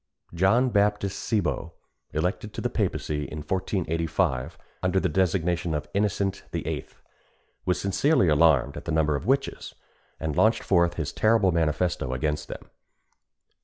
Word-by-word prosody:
John 100 +9 +3
Baptist 100 -2 +1
Cibo, 105 0 -1 0.4
elected 90 +7 -2
to - - -4
the - - -1
papacy 75 -1 -1
in 75 - -7
1485, 80 -4 -1 0.2
under 95 +1 +2
the - - +1
designation 90 -3 0
of 75 0 -3
Innocent 100 -1 0
VIII., - - -3 0.8
was 90 - +1
sincerely 100 - +2
alarmed 75 -3 +4
at - - -8
the - - -3
number 80 -2 +2
of 80 - -4
witches, 135 +2 -1 0.4
and 80 -2 -3
launched 110 +1 +3
forth 85 -2 +2
his 80 -4 -3
terrible 110 -4 +3
manifesto 80 -4 0
against 75 +3 -2
them. - - -9
90 Hz, 135 wpm, -26 LUFS, 80-100 Hz, 0.8 s, alarmed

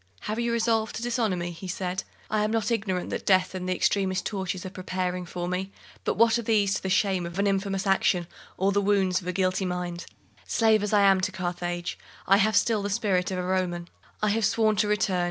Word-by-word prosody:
"Have 215 +2 -3
you 235 0 0
resolved 225 -1 +1
to 230 - -4
dishonour 230 -5 0
me?" 175 0 -3
he 170 +3 -8
said. 180 0 -3 0.2
"I 215 -1 0
am 210 - +1
not 225 0 0
ignorant 195 -5 -1
that - - -3
death 185 -1 +3
and 185 -1 -4
the 185 - +1
extremest 190 -1 +1
tortures 190 -2 -3
are 185 - -5
preparing 185 -1 -3
for 175 0 -4
me; 185 +2 -3 0.3
but - - +1
what 230 +1 +4
are - - -1
these 210 -3 +2
to - - -2
the 190 - -3
shame 190 -1 +2
of 170 +1 -6
an 200 - +2
infamous 195 0 0
action, 190 -2 +2 0.3
or 195 +2 +2
the 200 +1 +2
wounds 195 -2 +2
of 180 - -10
a - - 0
guilty 185 +1 0
mind? 180 -1 -4 0.4
Slave 220 -2 +3
as 210 - -2
I 205 -1 +4
am 195 -1 +5
to - - -1
Carthage, 175 -1 -3 0.3
I 195 - +5
have 215 +1 +2
still 215 0 +3
the 200 - -2
spirit 195 -4 +1
of 190 - -3
a 180 - -2
Roman. 180 -2 -1 0.3
I 210 - +3
have 220 +2 +1
sworn 215 +1 +3
to 210 - +2
return. 205 -3 +1
195 Hz, 230 wpm, -26 LUFS, 180-210 Hz, 0.4 s, am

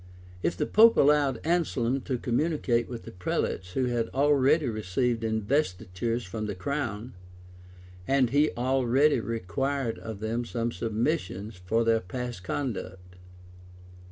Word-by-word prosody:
If 85 0 -1
the - - 0
pope 225 +2 +6
allowed 140 -4 +4
Anselm 135 -7 0
to 130 -3 -1
communicate 125 -1 0
with 120 -2 -6
the - - -9
prelates 90 0 -2
who 130 - +1
had 120 -2 -1
already 145 +1 +3
received 115 +2 -1
investitures 110 -1 -1
from 110 +3 -5
the 105 - -4
crown; 120 +1 -3 0.9
and 135 -3 +3
he 145 +2 +4
only 130 +3 +3
required 115 +4 -2
of 110 -3 -7
them 115 +3 -2
some 115 0 -2
submissions 110 - -2
for 100 +6 0
their 115 0 +3
past 120 +4 -5
misconduct. 90 -5 -5
120 Hz, 130 wpm, -28 LUFS, 110-135 Hz, 0.9 s, pope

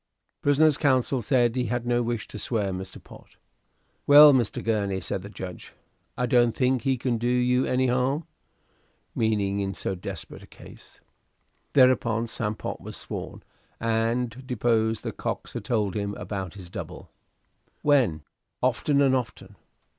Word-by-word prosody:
Prisoner's 145 +1 +4
counsel 130 -2 +2
said 120 0 +2
he 125 -1 0
had 120 +1 -2
no 120 0 +1
wish 120 -1 -3
to 105 - -8
swear 105 -2 -1
Mr. 95 0 -6
Pott. - - -16 0.7
"Well, 145 0 +10
Mr. 120 -5 0
Gurney," 100 -4 0
said 95 +1 -4
the 100 - -9
judge, 95 -3 -9 0.4
"I 125 - +1
don't 120 -1 +3
think 130 -1 +1
he 135 -1 0
can 120 -1 -1
do 120 - -1
you 125 +1 +2
any 130 +1 +1
harm." 130 +5 0 0.9
Meaning 100 -3 0
in 95 -1 -2
so - - -3
desperate 90 - -7
a - - -14
case. - - -15 0.7
Thereupon 120 -4 +4
Sam 110 -2 -3
Pott - - -6
was - - -8
sworn, - - -7 0.4
and 115 +2 -1
deposed 115 -3 0
that - - -5
Cox - - -4
had - - -6
told 105 -5 0
him 100 -1 -2
about 95 -3 -5
this 90 -3 -11
double. - - -8 0.7
"When?" 120 - +3 0.4
"Often 140 -1 +2
and 135 -1 +3
often." 120 -5 -5
120 Hz, 155 wpm, -26 LUFS, 105-130 Hz, 0.9 s, Well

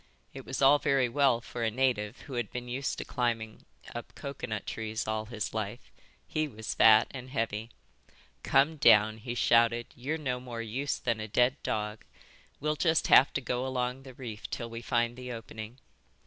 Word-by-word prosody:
It 135 - -9
was 135 +1 -2
all 145 +2 +7
very 135 -3 +2
well 125 -1 +3
for 120 0 -7
a 115 - +2
native 115 -2 0
who 140 - -10
had 120 -5 -2
been 125 0 -5
used 130 +3 -2
to - - -5
climbing 115 -4 -2 0.3
up 120 - -8
coconut 125 -7 -5
trees 110 0 -4
all 110 0 -1
his 110 -2 -4
life. 110 +2 -5 0.4
He 155 0 -1
was 110 -5 -5
fat 110 -1 +7
and 130 -1 -8
heavy. 115 -3 -2 0.7
"Come 145 +4 +3
down," 110 -5 +6
he 120 +2 -5
shouted. 115 0 +3
"You're 140 +6 -3
no 130 -5 -2
more 125 -2 -7
use 130 +6 -2
than 115 -3 -1
a 110 - -4
dead 125 +5 +2
dog. 105 0 -3 0.6
We'll 150 +1 -1
just 160 -1 +2
have 135 - +7
to 140 - -1
go 125 0 -2
along 125 0 -2
the 130 -2 -12
reef 115 -5 -7
till 115 -1 -5
we 115 0 -6
find 120 0 0
the 125 0 -7
opening." 115 0 -8
120 Hz, 185 wpm, -30 LUFS, 110-130 Hz, 0.7 s, all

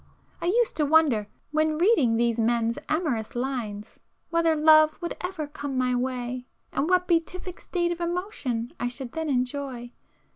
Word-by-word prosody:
I - - -1
used 465 +5 +2
to 305 - +2
wonder, 285 -9 +4 0.2
when 310 0 +1
reading 325 - +4
these 235 0 +1
men's 230 0 +1
amorous 295 -10 -1
lines, 240 -5 -4 0.3
whether 335 -1 +3
love 310 0 +5
would 340 - -4
ever 360 -4 -3
come 285 -2 -5
my 250 0 +1
way, 250 0 -2 0.2
and 305 - -1
what 360 -1 +3
beatific 355 +1 -1
state 345 -1 -1
of 345 0 -4
emotion 340 - -3
I 245 - 0
should 245 0 -6
then 320 +1 -3
enjoy. 250 -2 -2
285 Hz, 155 wpm, -26 LUFS, 245-335 Hz, 0.3 s, love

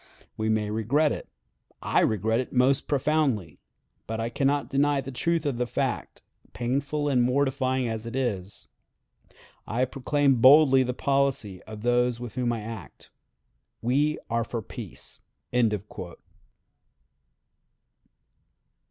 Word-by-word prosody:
We 110 0 -1
may 105 -1 0
regret 130 +8 +2
it. - - -5 0.5
I - - +2
regret 110 +2 +1
it 130 - -4
most 130 +2 +2
profoundly; 140 - 0 0.5
but 110 0 -3
I 115 +1 -1
can 135 +3 0
not 145 0 +1
deny 145 +1 +2
the 135 0 -5
truth 165 +5 0
of 135 -4 -1
the 125 - 0
fact, - - -3 0.3
painful 140 +6 -1
and 130 -4 +3
mortifying 130 0 +1
as 110 0 -4
it 115 - -6
is.... 105 -7 -3 1.0
I 120 +4 +1
proclaim 135 +1 +1
boldly 135 +2 +7
the 125 -1 -1
policy 135 -9 0
of 110 -1 -9
those 120 0 +2
with 120 -3 -7
whom 125 -2 0
I 115 -2 -3
act. 110 -4 -9 0.7
We 145 +6 +2
are 115 0 0
for 115 -1 -5
peace." - - -7
125 Hz, 125 wpm, -26 LUFS, 115-140 Hz, 1.0 s, boldly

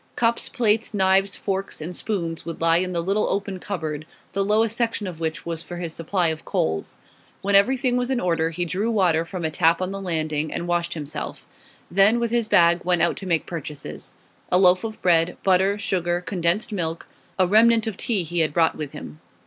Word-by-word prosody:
Cups, 235 0 +1
plates, 220 -2 +1
knives, 195 0 +3
forks, 195 0 -3
and 170 +3 -6
spoons 170 -6 -3
would 165 -1 -6
lie 165 0 +4
in 185 +1 -1
the 170 -1 -1
little 200 +4 +1
open 195 -1 -2
cupboard, 155 -6 -4 0.3
the 195 +1 +1
lowest 215 +2 +2
section 230 -3 -1
of 175 -4 -6
which 160 -1 -3
was 165 -1 -3
for 175 0 -8
his 170 -2 -4
supply 170 +1 0
of 160 -1 -4
coals. 80 0 -2 0.5
When 200 +1 0
everything 250 +5 +3
was 250 0 -1
in 260 -2 +1
order 165 -4 +1
he 175 +2 -3
drew 195 +6 -1
water 180 -7 +2
from 170 0 -5
a 160 - -1
tap 165 +1 +3
on 185 0 -2
the 195 0 -5
landing 155 -4 -1
and 175 - -4
washed 175 0 -1
himself; 150 -3 -6 0.5
then, 200 +6 +4
with 235 -1 -1
his 235 -2 +1
bag, 170 -3 +4
went 175 -2 +2
out 170 - +2
to 195 - -6
make 165 -3 +1
purchases. 150 - -7 0.4
A 180 - +5
loaf 185 +1 +5
of 220 -1 -5
bread, 170 -1 +3
butter, 190 +1 +3
sugar, 175 -3 -1
condensed 180 +3 0
milk; 165 -5 -3 0.3
a 185 - +4
remnant 225 +4 +5
of 220 -3 -3
tea 205 -2 -1
he 170 +1 -3
had 155 -2 +1
brought 165 0 +3
with 150 -3 -6
him. 75 +1 -9
180 Hz, 205 wpm, -23 LUFS, 165-205 Hz, 0.5 s, A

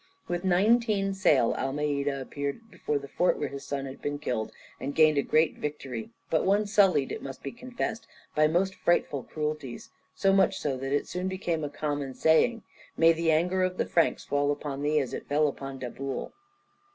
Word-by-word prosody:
With 175 0 -2
nineteen 200 +2 +3
sail 150 -11 +3
Almeida 140 0 -1
appeared 145 - -5
before 150 - -2
the 140 0 -7
fort 180 +5 +1
where - - -2
his 140 0 -7
son 140 -1 -3
had 135 0 -9
been 145 0 -2
killed, 120 -7 -2 0.3
and 140 +1 -4
gained 155 -2 +5
a - - +4
great 155 +3 +2
victory, 135 -6 -5 0.2
but 160 - +3
one 200 +2 +3
sullied, 195 -9 +3
it - - -4
must 135 -1 -8
be - - -4
confessed, 240 -2 -5 0.3
by 155 0 +4
most 185 +4 +1
frightful 170 -6 +1
cruelties, 150 -4 -5 0.2
so 195 -1 +3
much 195 -1 +3
so 140 -3 -1
that 135 +1 -4
it 145 - 0
soon 180 +1 -3
became 175 -4 -2
a 145 - -2
common 145 -2 -3
saying: 220 +9 +3 0.3
"May 165 0 +6
the 165 0 +1
anger 180 +4 +2
of 185 0 0
the - - +1
Franks 165 - +1
fall 145 0 +1
upon 145 -1 -4
thee 150 +1 +2
as 135 -4 -3
it - - -6
fell 150 +1 +3
upon 135 -1 -5
Daboul." 130 +1 -5
150 Hz, 190 wpm, -28 LUFS, 140-185 Hz, 0.3 s, May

